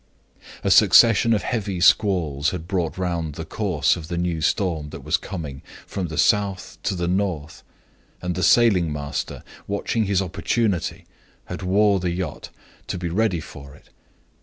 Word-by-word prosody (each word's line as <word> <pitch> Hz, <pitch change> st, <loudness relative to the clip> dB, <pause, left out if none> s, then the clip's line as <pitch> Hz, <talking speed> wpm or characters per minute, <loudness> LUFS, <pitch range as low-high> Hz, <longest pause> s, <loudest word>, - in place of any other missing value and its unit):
"A -, -, +1 dB
succession 115 Hz, 0 st, +6 dB
of 110 Hz, -, +2 dB
heavy 100 Hz, -6 st, -2 dB
squalls 85 Hz, -5 st, +3 dB
had 85 Hz, -2 st, -6 dB
brought 90 Hz, -4 st, -2 dB
round 85 Hz, -5 st, -2 dB
the -, -, -6 dB
course -, -, 0 dB
of 80 Hz, -3 st, -8 dB
the 85 Hz, -, -4 dB
new 85 Hz, -2 st, -1 dB
storm 80 Hz, -2 st, 0 dB
that -, -, -9 dB
was -, -, +1 dB
coming, 75 Hz, -8 st, -5 dB, 0.2 s
from 95 Hz, -3 st, -4 dB
the 80 Hz, -1 st, -7 dB
south 100 Hz, -4 st, +1 dB
to 100 Hz, -, -1 dB
the 85 Hz, -1 st, -2 dB
north; 90 Hz, -5 st, -2 dB, 0.6 s
and 90 Hz, 0 st, -3 dB
the 90 Hz, -, -3 dB
sailing 95 Hz, -5 st, +4 dB
master, 75 Hz, -1 st, -4 dB, 0.2 s
watching 105 Hz, +2 st, -1 dB
his 100 Hz, -2 st, +1 dB
opportunity, 95 Hz, +1 st, -1 dB, 0.4 s
had -, -, -7 dB
wore 100 Hz, +2 st, +3 dB
the 90 Hz, 0 st, -1 dB
yacht 85 Hz, -3 st, -4 dB, 0.4 s
to -, -, -3 dB
be 85 Hz, -1 st, -3 dB
ready 95 Hz, -1 st, +1 dB
for 70 Hz, -4 st, -11 dB
it. -, -, -21 dB
90 Hz, 160 wpm, -23 LUFS, 80-100 Hz, 0.6 s, succession